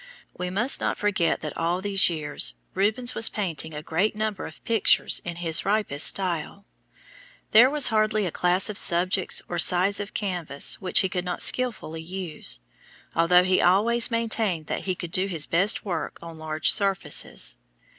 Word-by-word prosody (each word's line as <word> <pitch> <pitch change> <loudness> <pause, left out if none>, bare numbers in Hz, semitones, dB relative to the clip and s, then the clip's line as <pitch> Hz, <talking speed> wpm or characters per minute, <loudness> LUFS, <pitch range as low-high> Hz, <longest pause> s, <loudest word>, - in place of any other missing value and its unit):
We 180 0 -4
must 220 +9 -1
not - - -1
forget 200 -5 0
that 155 - -6
all 170 +2 -1
these 195 -1 +2
years 150 -3 -2 0.2
Rubens 215 +6 0
was 225 - +5
painting 165 -6 -4
a 150 - -7
great 185 +8 -1
number 215 -2 -3
of 160 - -15
pictures 225 -3 +2
in 175 0 -6
his 165 -2 0
ripest 200 -8 +1
style. 185 +1 -2 0.9
There 235 +4 +7
was 295 -1 +3
hardly 215 -2 +1
a 175 - -3
class 180 +3 +1
of 210 - -4
subjects 180 +1 +2
or 175 - -4
size 185 +4 +5
of 205 0 -7
canvas 175 -8 -2
which 185 - +3
he 190 - 0
could 180 -1 -3
not 180 -1 -3
skillfully 220 -10 -1
use, 165 - -5 0.5
although 180 +2 +4
he 185 0 +2
always 225 +7 +3
maintained 220 -8 -1
that - - -5
he 185 -2 -2
could 175 -2 -7
do 185 +2 +2
his 165 -6 0
best 190 +7 +1
work 175 -5 -4
on 165 -1 -11
large 155 0 +1
surfaces. 195 - -1
185 Hz, 170 wpm, -24 LUFS, 170-210 Hz, 0.9 s, There